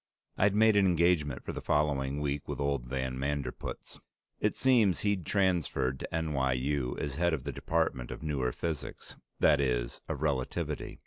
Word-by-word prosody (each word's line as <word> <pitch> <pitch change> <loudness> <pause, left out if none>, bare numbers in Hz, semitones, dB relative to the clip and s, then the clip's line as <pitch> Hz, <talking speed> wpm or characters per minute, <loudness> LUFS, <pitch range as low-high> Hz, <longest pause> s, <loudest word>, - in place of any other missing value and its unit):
I'd 100 +1 +3
made 110 0 +5
an 100 -1 +5
engagement 85 -6 +2
for - - -4
the - - -5
following 70 -2 +1
week 70 -1 -2
with - - -4
old 70 -3 -1
van 65 0 -3
Manderpootz. 70 0 -4 0.4
It - - +1
seems 115 -8 +3
he'd 100 -5 0
transferred 85 -10 +1
to - - -6
N.Y.U. 70 -3 0
as 70 - -3
head 85 -1 +2
of 70 - -8
the 70 - -3
department 70 -3 -1
of - - -7
Newer 70 -5 0
Physics 80 0 -5 0.2
that 75 - +5
is, - - -1
of 75 -2 -3
Relativity. 70 -4 -2
75 Hz, 165 wpm, -30 LUFS, 65-85 Hz, 0.4 s, made